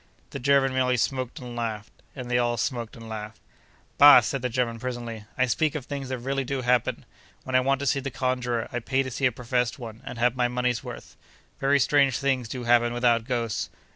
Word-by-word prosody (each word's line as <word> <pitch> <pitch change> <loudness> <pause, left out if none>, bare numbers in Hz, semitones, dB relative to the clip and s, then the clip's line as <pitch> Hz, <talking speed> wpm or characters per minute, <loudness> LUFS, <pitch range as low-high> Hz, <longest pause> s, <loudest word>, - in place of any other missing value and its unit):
The 140 - -5
German 135 0 +3
merely 125 -1 +2
smoked 130 +2 -2
and 125 -4 -8
laughed; 110 -3 -4 0.2
and 130 -2 -6
they 125 - +3
all 120 -1 0
smoked 120 -5 -3
and 115 -1 -11
laughed. 110 -1 -7 0.6
'Bah!' 145 -3 +10
said 135 +4 -3
the 125 - -1
German, 115 -1 -1
presently. 120 -3 -5
'I 130 - +3
speak 155 +5 0
of 145 -5 -4
things 140 -2 -5
that 130 - -2
really 135 +3 -2
do 130 +1 -3
happen. 125 -1 +1 0.4
When 130 - -3
I - - +7
want 135 +1 +1
to - - -2
see 140 0 +2
the 135 0 -4
conjurer, 125 -2 -1
I 120 - -1
pay 135 +3 0
to 130 - -6
see 130 +2 +1
a - - -1
professed 125 0 -1
one, 115 -3 -9
and - - -7
have 120 +1 +2
my 125 -1 +2
money's 125 -1 -1
worth. - - -9 0.4
Very 140 +1 +3
strange 140 -2 +3
things 130 -4 -1
do 125 0 -5
happen 120 0 +3
without 120 -2 +2
ghosts. 115 -4 -2
125 Hz, 220 wpm, -26 LUFS, 120-135 Hz, 0.6 s, Bah